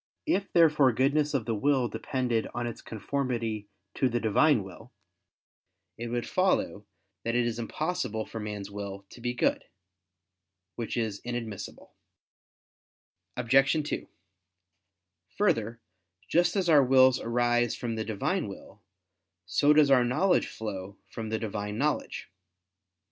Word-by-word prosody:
If 200 -10 0
therefore 150 -6 +5
goodness 145 +4 +1
of 125 -5 0
the 115 - -1
will 130 +3 +2
depended 120 0 -1
on 120 0 -2
its 120 - -6
conformity 115 -3 -3 0.3
to 130 - +1
the 120 0 0
Divine 115 +2 +3
will, 95 -2 -12 1.0
it 120 - -5
would 120 0 -2
follow 185 - 0 0.4
that 115 +1 -1
it 120 -1 +2
is 120 0 -2
impossible 120 -3 -2
for 115 - -7
man's 105 -2 -5
will 100 -1 -6
to 120 - -13
be 120 0 -2
good. - - +1 1.1
Which 115 +2 -4
is 110 -4 -1
inadmissible. 115 -5 -6 1.4
Obj. 135 +3 +4
2: - - -3 1.3
Further, 120 - +1 0.5
just 175 +2 +2
as 190 -3 +1
our 150 -4 +6
wills 130 0 +5
arise 120 0 +1
from 120 -3 -4
the 110 0 -2
Divine 110 -2 -1
will, - - -11 0.6
so 95 +11 +3
does 150 -2 +5
our 130 -2 +6
knowledge 125 +11 +2
flow 100 -2 -6
from 110 -1 -5
the 110 - 0
Divine 105 -1 -4
knowledge. 150 +4 -1
120 Hz, 130 wpm, -28 LUFS, 110-140 Hz, 1.4 s, our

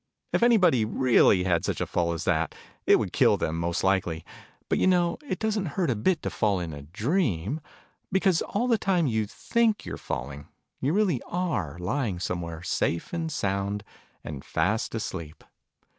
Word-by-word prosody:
If - - +2
anybody 195 - +5
really 110 -4 +4
had 85 -3 +1
such - - -2
a - - 0
fall 85 -1 0
as 85 - -4
that, 85 -3 0 0.3
it - - +8
would - - -3
kill - - +4
them, 80 +1 -2
most 85 0 -1
likely: 90 -4 +1 0.4
but - - +1
you - - +3
know 175 -2 +2
it 185 - -2
doesn't 215 -2 -1
hurt 175 -8 +2
a - - 0
bit 160 - +1
to - - -2
fall 105 -4 +1
in 85 -3 -4
a 70 - -7
dream, 110 - -1 0.5
because, 190 -3 +3
all 235 +5 -1
the 230 -3 +3
time 185 -5 +2
you 110 -5 0
think 225 - 0
you're - - -5
falling, 70 +3 -5 0.3
you 135 - 0
really 185 - +2
are 130 - -2
lying 100 +2 -1
somewhere, 85 -2 -4
safe 85 - -1
and 165 -2 -2
sound, 100 -4 -1 0.4
and 70 -3 -7
fast 105 +8 0
asleep 85 -8 -5
110 Hz, 175 wpm, -27 LUFS, -, 0.5 s, it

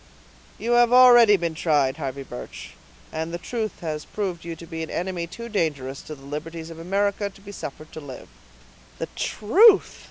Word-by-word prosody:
"You 235 - -3
have 240 0 +5
already 240 -4 +8
been 170 -2 -2
tried, 145 -4 +1
Harvey 140 -2 -4
Birch; 125 -2 -9 0.4
and 160 +1 -3
the 170 - -3
truth 220 +3 -4
has 155 -3 -4
proved 190 -5 -4
you 170 0 -6
to 170 - -11
be 165 0 -6
an 160 - -5
enemy 175 -1 -3
too 235 +7 -8
dangerous 145 - -2
to 155 - -8
the 135 -1 -16
liberties 160 +3 -6
of 165 - -10
America 200 +3 0
to 195 - -18
be 200 +1 -11
suffered 155 -4 -8
to - - -8
live." 135 -3 -10 0.7
"The - - -4
truth!" 390 - +4
170 Hz, 185 wpm, -24 LUFS, 155-205 Hz, 0.7 s, already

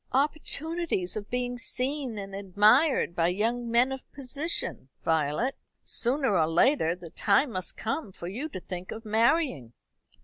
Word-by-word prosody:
"Opportunities 305 - -1
of 210 -1 -5
being 245 0 -2
seen 260 -1 -2
and 195 -1 -6
admired 205 - +3
by 170 0 +3
young 230 +6 0
men 240 +3 +3
of 265 -1 -7
position, 280 - -3 0.2
Violet. 160 - +1 0.3
Sooner 250 - +1
or 160 - +3
later 170 - +3
the 175 -3 -11
time 240 +6 +3
must 185 -4 -4
come 225 0 -3
for 175 - -8
you 250 - -4
to 270 - -6
think 180 0 -7
of 225 +1 -7
marrying." 225 - +2
230 Hz, 145 wpm, -28 LUFS, 185-270 Hz, 0.3 s, admired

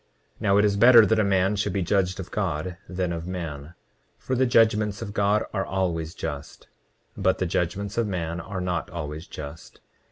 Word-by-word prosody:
29:12 - - -22
Now 100 -2 +3
it 105 - +5
is 100 -1 +2
better 115 0 +8
that 110 +1 +2
a - - +4
man 95 0 +2
should 100 -2 -1
be 95 -1 0
judged 95 0 0
of 95 - -7
God 90 -3 -2
than 90 -1 -2
of 85 +1 -5
man, 80 -4 -6 0.4
for 130 - -3
the 130 +1 +2
judgments 105 -3 +3
of 100 -2 -7
God 105 +1 +2
are 95 -2 0
always 85 -4 -2
just, 75 -3 -6 0.5
but 95 0 +1
the 95 - -1
judgments 95 +5 -2
of 115 - +1
man 85 -3 -3
are 95 +2 -5
not 90 -2 -2
always 80 -2 -6
just. 75 +2 -9
95 Hz, 195 wpm, -25 LUFS, 85-105 Hz, 0.5 s, better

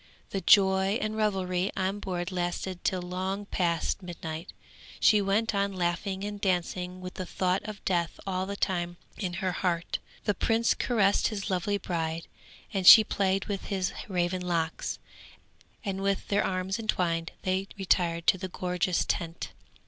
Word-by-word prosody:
The 195 - -2
joy 190 +1 +5
and 215 0 -2
revelry 190 -3 0
on 190 +2 0
board 180 -2 -3
lasted 180 0 -3
till 185 -1 0
long 190 +3 -3
past 175 0 0
midnight; 165 -2 -6 0.5
she 210 -1 +5
went 210 +3 +1
on 200 0 0
laughing 185 +2 -1
and 205 0 -5
dancing 180 -1 -1
with 185 0 -7
the 185 - -5
thought 185 0 0
of 215 -1 -8
death 170 -3 0
all 190 -1 -1
the 200 - -3
time 175 -3 -1 0.2
in 185 -4 -2
her 185 +1 -1
heart. 170 -2 -1 0.2
The 205 - +2
prince 225 +4 +2
caressed 205 -5 +2
his 205 -2 -3
lovely 190 +3 0
bride 165 -3 -3 0.5
and 190 -2 0
she 220 - +12
played 195 -2 0
with 200 -2 -4
his 190 -3 -1
raven 180 -1 0
locks, 170 -2 -1 0.9
and 195 -1 -2
with 195 0 -1
their 205 0 +3
arms 185 +2 -1
entwined 170 -6 0
they 190 +1 0
retired 170 -3 +1
to 185 - +4
the 185 - -3
gorgeous 180 0 0
tent. 165 -1 -3
185 Hz, 155 wpm, -29 LUFS, 175-200 Hz, 0.9 s, she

